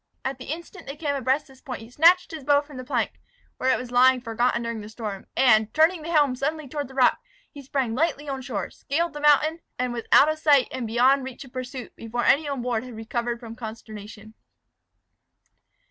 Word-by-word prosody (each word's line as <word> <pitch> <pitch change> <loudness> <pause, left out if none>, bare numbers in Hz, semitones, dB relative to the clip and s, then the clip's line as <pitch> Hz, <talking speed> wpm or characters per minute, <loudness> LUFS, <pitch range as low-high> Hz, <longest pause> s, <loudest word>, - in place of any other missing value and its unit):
At 265 0 -3
the 255 - -8
instant 340 +4 -7
they 275 - -5
came 295 -2 -2
abreast 270 +2 0
this 265 -2 -19
point 255 -5 -6
he 225 +1 -12
snatched 340 +7 +5
his 315 -3 -7
bow 285 +1 +4
from 290 -2 -13
the 255 - -6
plank, 250 - -2 0.4
where 260 - 0
it - - +2
was 250 -1 -7
lying 255 +1 +5
forgotten 235 0 0
during 230 -1 -4
the 210 - -9
storm, 215 -3 -6
and, 220 -4 +4
turning 320 +2 +4
the 315 - -7
helm 290 -5 +3
suddenly 300 +3 -3
toward 290 +1 -4
the 265 - -14
rock, 255 -2 +4 0.3
he 285 - -10
sprang 265 -3 -2
lightly 300 +1 -1
on 270 -1 -3
shore, 220 -7 -4
scaled 335 +5 -2
the 295 - -7
mountain, 300 +2 +4 0.2
and 250 -1 -1
was 235 -1 -5
out 290 - +8
of 310 0 -1
sight 285 -4 +4
and 255 -3 -4
beyond 255 +4 +3
reach 260 +1 -8
of 255 - -17
pursuit, 255 0 -7
before 235 +2 -4
any 295 +2 +4
on 275 -4 -3
board 240 -2 -1
had 250 -2 -9
recovered 235 +1 -3
from 230 -2 -9
consternation. 220 -2 -9
260 Hz, 215 wpm, -25 LUFS, 235-290 Hz, 0.4 s, out